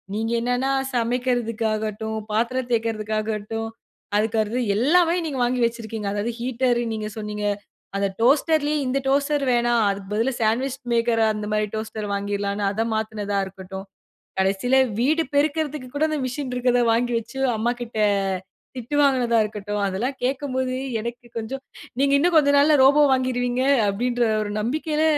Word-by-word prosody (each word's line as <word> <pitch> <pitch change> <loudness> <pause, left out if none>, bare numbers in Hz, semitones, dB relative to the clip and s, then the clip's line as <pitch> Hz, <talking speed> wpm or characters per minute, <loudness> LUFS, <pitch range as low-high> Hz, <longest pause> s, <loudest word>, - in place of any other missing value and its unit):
நீங்க 225 +2 -1
என்னான்னா 245 +3 0 0.2
சமைக்கிறதுக்காகட்டும், 225 -3 -1
பாத்திரம் 240 +3 0
தேய்க்கிறதுக்காகட்டும், 220 -1 -2 0.5
அறுக்கறது 220 +2 0 0.2
எல்லாமே 335 - +4
நீங்க 280 -5 -3
வாங்கி 245 0 0
வச்சிருக்கீங்க. 225 -3 -4
அதாவது 210 +3 -1
ஹீட்டரு, 245 0 +1
நீங்க 215 -1 -3
சொன்னீங்க. 210 -1 -4 0.5
அத 200 0 +1 0.2
டோஸ்டர்லேயே, 300 +3 +3
இந்த 265 +2 +1
டோஸ்டர் 280 +1 +2
வேணாம். 240 -1 +2
அதுக்கு 195 0 -5
பதிலா 230 +5 +1
சண்ட்விச் 255 +5 0
மேக்கர். 230 -1 +2
அந்த 210 0 -4
மாதிரி 215 0 +1
டோஸ்டர் 220 -1 -4
வாங்கிறலாம்ன்னு. 200 0 -2
அதை 225 +2 -1
மாத்தினதா 210 -2 -2
இருக்கட்டும், 190 +1 -8 0.5
கடைசியில 195 +7 +2 0.2
வீடு 310 +6 +2
பெருகிறதுக்கு 295 -2 0
கூட 310 +2 +3
அந்த 305 -2 -1
மிஷின் 255 +1 -4
இருக்கிறதை 245 -1 +2
வாங்கி 240 +1 +1
வைச்சு, 235 +4 -7 0.2
அம்மா 235 +3 +1
கிட்ட 230 -2 -6 0.8
திட்டு 250 +4 -3
வாங்கினதா 250 -4 +3
இருக்கட்டும், 205 -1 -4
அதெல்லாம் 235 +9 -2
கேக்கும்போது 260 -1 -1 0.3
எனக்கு 235 +2 -6
கொஞ்சம் 265 +5 -5 0.4
நீங்க 280 0 +3
இன்னும் 345 +3 +2
கொஞ்ச 285 -2 +5
நாள்ல 295 +1 +5
ரோபோ 285 +2 +6
வாங்கிருவீங்க. 250 -1 0 0.3
அப்படின்ற 240 +4 0 0.2
ஒரு 205 - -4
நம்பிக்கையில 305 +6 0
240 Hz, 135 wpm, -23 LUFS, 215-265 Hz, 0.8 s, ரோபோ